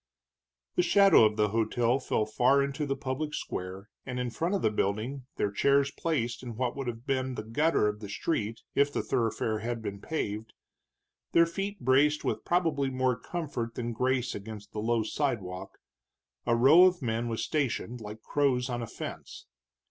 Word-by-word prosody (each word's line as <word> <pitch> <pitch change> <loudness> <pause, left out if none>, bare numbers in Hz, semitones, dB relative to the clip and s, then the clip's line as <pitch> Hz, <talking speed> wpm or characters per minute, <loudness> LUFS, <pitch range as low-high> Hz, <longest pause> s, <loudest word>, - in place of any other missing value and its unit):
The - - +6
shadow 200 - +6
of 105 0 +1
the 105 -1 +3
hotel 115 +3 +1
fell 110 -4 0
far 125 +6 +3
into 140 +2 -2
the 135 - 0
public 135 +3 -3
square, 95 +2 -5 0.2
and 125 -1 -4
in 125 -1 -2
front 170 - -1
of 195 - -2
the 110 - +3
building, 110 +6 -2
their 100 - 0
chairs 140 +6 +3
placed 120 -9 -2
in 120 -3 -7
what 125 +1 -1
would 135 -2 -4
have 120 0 -5
been 130 -2 -1
the 110 - -4
gutter 115 +2 +2
of 105 0 -2
the 105 -2 -8
street 115 -2 -2
if 140 +1 +3
the - - -2
thoroughfare 115 -3 0
had 115 +1 -3
been 100 -2 -5
paved, 110 -8 -3 0.8
their 170 - +6
feet 195 +3 -4
braced 145 +4 +3
with - - -2
probably 160 -6 +1
more 130 -1 +1
comfort 125 -8 -4
than 120 -1 -3
grace 125 +1 0
against 105 0 -8
the 105 - -5
low 115 +1 +1
sidewalk, 100 -8 -3 0.7
a 115 - +4
row 145 +10 +7
of 180 -5 +2
men 115 0 -1
was 115 -1 -2
stationed, 125 -5 -2
like 105 +1 -8
crows 130 -3 +1
on 120 0 -2
a 115 - -4
fence. - - -8
125 Hz, 180 wpm, -29 LUFS, 110-140 Hz, 0.8 s, row